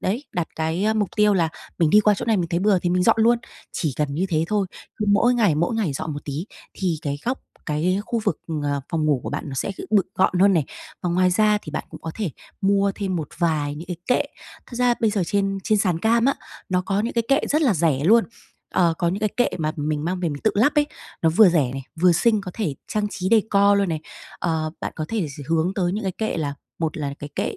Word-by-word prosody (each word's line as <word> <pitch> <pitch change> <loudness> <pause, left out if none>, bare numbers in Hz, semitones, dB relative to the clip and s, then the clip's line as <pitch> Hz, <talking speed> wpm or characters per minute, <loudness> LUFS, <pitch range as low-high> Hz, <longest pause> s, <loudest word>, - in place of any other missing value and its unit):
đấy, 230 +10 -1
đặt 175 -2 -2
cái 170 +7 0
mục 210 -3 +1
tiêu 210 -1 +4
là 170 -4 +2 0.3
mình 165 -3 +3
đi 210 - +7
qua 210 0 +4
chỗ - - -4
này 225 -2 +2
mình 170 -3 -1
thấy 170 - 0
bừa 200 -1 +3
thì 175 0 -1
mình 180 0 +2
dọn - - +4
luôn. 235 +2 +4 0.3
Chỉ 155 -6 -1
cần 145 -2 -1
như 180 +6 0
thế 160 -3 +1
thôi, 205 -2 +1 0.3
cứ 210 - -2
mỗi 240 +4 +4
ngày, 210 -10 +3
mỗi 170 +9 0
ngày 205 -10 0
dọn 160 +3 -4
một 145 - -7
tí, 150 +6 -4 0.3
thì 175 -5 -1
cái 145 -1 -2
góc, 255 +2 -1 0.3
cái 170 +6 0
khu 235 - -1
vực, 155 - 0 0.2
ờ, 145 -1 -1
phòng 160 -2 -1
ngủ 145 -4 +2
của - - -5
bạn 145 - -3
nó 135 - -5
sẽ 195 - -2
kiểu - - -7
bực 205 -4 +3
gọn 185 -1 +2
hơn 200 +1 +6
này. 155 - +2 0.4
Và 180 - 0
ngoài 180 +1 +3
ra 210 +2 +3
thì 155 - -8
bạn 155 - -3
cũng - - -11
có 160 - -5
thể 205 -8 -2 0.3
mua 200 0 +2
thêm 190 -3 -2
một 155 -4 -4
vài 155 -4 0
những 160 +4 -8
cái 180 - -3
kệ. 250 - +3 0.4
Thật 240 - -11
ra 245 0 +3
bây 220 -2 +3
giờ 205 -3 0
trên 195 +1 0
trên 215 -2 +2
sàn 180 -5 +1
cam 230 +4 +2
á, 275 - +3 0.3
nó 180 -1 +1
có 195 +2 0
những 230 +3 -2
cái 235 - +2
kệ 275 +2 +4
rất 305 +2 +2
là 240 -9 +3
rẻ 155 -4 +1
luôn. 225 +5 +6 0.5
Ờ, 170 -2 +3
có 170 - +1
những 190 +4 -2
cái 215 - +2
kệ 245 - +3
mà 155 -1 -1
mình 150 0 -2
mang 180 +1 -2
về 175 - 0
mình 145 -2 -6
tự 215 - +5
lắp 250 +9 +3
ấy, 295 0 +3 0.4
nó 165 - +5
vừa 195 +4 +7
rẻ 150 -8 +2
này, 135 0 -5 0.2
vừa 180 0 +6
xinh, 215 +5 +3
có 195 - -7
thể 190 -11 -2
trang 210 -1 0
trí 185 -1 -3
decor 205 -2 +4
luôn 200 -1 +1
này. 160 -2 -2 0.4
Ờ, 160 -2 -1
bạn - - -4
có 155 - -2
thể 220 -7 -1
sẽ 145 - -6
hướng 165 +4 +1
tới 180 -3 0
những 210 0 -3
cái 190 - -1
kệ 220 -4 -1
là 145 -3 -2 0.2
một 160 -2 -2
là 140 -2 -3
cái 145 - -7
kệ - - -2
185 Hz, 270 wpm, -23 LUFS, 160-210 Hz, 0.5 s, đi